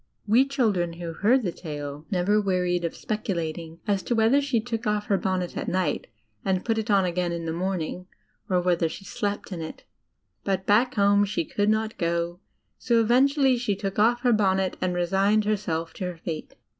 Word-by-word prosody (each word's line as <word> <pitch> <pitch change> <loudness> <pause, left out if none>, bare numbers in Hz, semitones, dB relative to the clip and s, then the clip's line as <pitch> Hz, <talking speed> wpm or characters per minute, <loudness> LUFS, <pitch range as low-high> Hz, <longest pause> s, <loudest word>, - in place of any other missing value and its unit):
We 235 +6 +4
children 210 - +1
who 170 -1 -6
heard 235 +9 +3
the 180 - -1
tale 150 -3 -7
never 200 +3 +2
wearied 180 -3 0
of 170 - -2
speculating 170 -6 -4
as 200 -3 +1
to 240 - -1
whether 225 +6 +4
she 270 -5 +1
took 225 -1 -4
off 210 0 0
her 200 - +2
bonnet 185 -2 -2
at - - -4
night 185 0 -1 0.4
and 190 -1 0
put 225 -1 +1
it 220 +1 -4
on 200 -2 +4
again 175 0 -1
in 170 -1 -4
the 160 - -2
morning, 180 0 -3 0.4
or 180 -1 +3
whether 175 -2 +1
she 195 - -9
slept 205 +1 -3
in 175 -3 -4
it. 160 - -7 0.6
But 190 -1 -1
back 230 +5 +3
home 200 0 +4
she 190 -5 -1
could 205 +5 0
not 220 0 0
go, 170 0 -1 0.4
so 235 -2 +2
eventually 265 +3 +4
she 235 -4 -1
took 195 0 -3
off 240 +3 +3
her 245 -2 +3
bonnet 190 -3 +2
and 180 -1 0
resigned 195 +4 +2
herself 165 -6 -1
to 185 - -5
her 180 -1 -5
fate. 160 -1 -6
195 Hz, 195 wpm, -26 LUFS, 175-215 Hz, 0.6 s, We